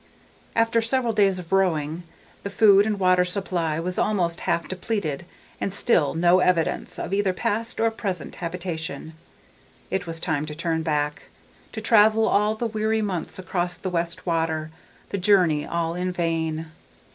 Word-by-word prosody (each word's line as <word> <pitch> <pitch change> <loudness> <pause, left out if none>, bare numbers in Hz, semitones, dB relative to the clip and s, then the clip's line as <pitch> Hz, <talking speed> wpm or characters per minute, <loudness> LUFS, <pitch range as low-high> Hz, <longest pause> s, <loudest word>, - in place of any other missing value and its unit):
After 230 0 +3
several 235 0 0
days 200 -3 +3
of 180 -1 -9
rowing, 165 -4 +1 0.4
the 200 - -5
food 200 0 +5
and 210 -2 -1
water 185 -1 +4
supply 180 -4 -1
was 180 +2 -3
almost 175 -5 0
half 170 - 0
depleted 180 -5 -3 0.3
and 195 - -2
still 160 - +2
no 175 +2 +4
evidence 180 -3 +1
of - - -4
either 195 -2 +1
past 225 +5 -2
or 225 0 +3
present 190 -8 -5
habitation. 165 -3 -5 0.8
It 190 -1 -2
was 165 0 -5
time 155 -3 -1
to 150 - -6
turn 165 0 -1
back, 150 -2 -2 0.4
to 220 - -5
travel 220 0 +5
all 210 +1 +2
the 235 - -3
weary 220 0 0
months 185 -5 -4
across 180 -2 -2
the 185 +1 -4
West 170 +1 -2
Water, 160 -2 -1 0.4
the 200 - -2
journey 180 -6 +3
all 170 -1 -1
in 180 +1 -2
vain. 165 -2 -2
180 Hz, 155 wpm, -24 LUFS, 165-205 Hz, 0.8 s, food